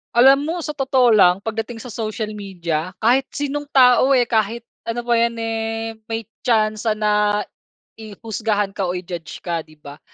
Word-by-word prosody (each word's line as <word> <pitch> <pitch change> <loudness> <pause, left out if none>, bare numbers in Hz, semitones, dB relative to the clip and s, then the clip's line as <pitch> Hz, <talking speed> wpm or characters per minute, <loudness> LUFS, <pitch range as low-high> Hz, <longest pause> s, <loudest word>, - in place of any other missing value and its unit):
Alam 270 +4 +6
mo 330 - -2
sa 300 - -3
totoo 265 -4 +2
lang, 195 -2 +5
pagdating 225 +1 -4
sa 250 - -8
social 215 -1 -4
media 180 -4 -4
kahit 250 +4 +3
sinong 290 0 -3
tao, 260 0 +5
eh, 245 - +4
kahit 230 0 -1 0.2
ano 235 +1 -2
pa 240 - -3
'yan, 235 0 +1
eh, 225 0 -3 0.2
may 225 0 -3 0.2
tsansa 215 -2 +1
na 210 -1 +1 0.6
i 215 -2 -9
husgahan 215 -2 -1
ka 195 -1 -2
o 180 - -2
i-judge 175 -2 -7
ka, 170 -2 -2
di 155 -1 -12
ba? 145 0 -12
225 Hz, 170 wpm, -20 LUFS, 200-240 Hz, 0.6 s, Alam